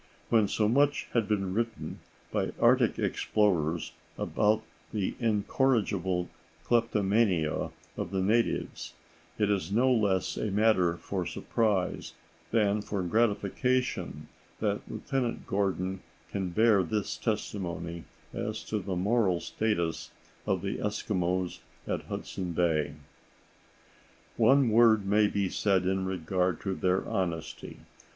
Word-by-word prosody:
When 110 -3 +4
so 105 +1 +1
much 140 +5 +2
has 115 -3 +2
been 100 -3 -1
written 115 0 -3 0.3
by - - -1
Arctic - - +4
explorers 85 -6 +1 0.3
about 110 +1 +1 0.3
the 105 -3 -1
incorrigible 100 -5 +1 0.4
kleptomania 105 -7 +1 0.3
of - - -3
the 95 - -1
natives, 115 +4 0 0.4
it 105 -1 +2
is 100 -1 -1
no 125 +5 +3
less 100 -5 +1
a 110 - -1
matter 100 -5 +3
for 95 0 -3
surprise 105 -5 -1 0.4
than 105 -2 +2
for 100 -2 -3
gratification 115 +5 0 0.3
that - - 0
Lieutenant 130 -4 -2
Gordon 95 -1 -1 0.3
can 95 -2 -2
bear 110 +2 +4
this 100 +4 -2
testimony 85 - -3 0.3
as - - -3
to 110 - -2
the 95 -1 -3
moral 95 -1 +2
status 85 -8 -1 0.4
of - - 0
the - - -2
Eskimos 95 -4 -1 0.3
at - - -3
Hudson 90 -2 -5
Bay: 80 -4 +1 1.4
"One 135 -2 +5
word 110 -2 +5
may 105 +1 +4
be 100 -1 0
said 95 -1 +1
in 95 0 0
regard 90 -1 0
to 95 - -2
their 95 0 0
honesty. 85 -4 -3
100 Hz, 115 wpm, -29 LUFS, 90-110 Hz, 1.4 s, One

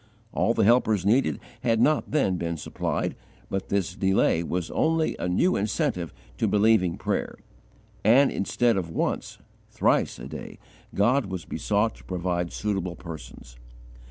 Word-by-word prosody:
All 115 - +1
the 110 - +3
helpers 110 -3 +3
needed 105 - +2 0.2
had 115 -2 +2
not 150 +6 +2
then 135 -12 +1
been 85 -1 -3
supplied, - - -2 0.4
but 95 - -3
this 100 -3 0
delay 95 -3 +2
was 85 0 -3
only 160 0 +1
a 90 - -1
new 175 - +2
incentive 90 -5 -1 0.3
to - - +2
believing 105 -4 +3
prayer: - - -2 0.7
and, 130 +6 +5
instead 115 +3 +1
of 90 -3 -2
once, 80 - -2 0.3
thrice, - - +1
a 60 +1 -8
day, - - -8 0.4
God 120 +5 +3
was 95 -3 -5
besought 105 +2 0
to - - -17
provide 90 -1 -2
suitable 95 -4 -2
persons. 80 -7 -10
100 Hz, 145 wpm, -26 LUFS, 85-115 Hz, 0.7 s, and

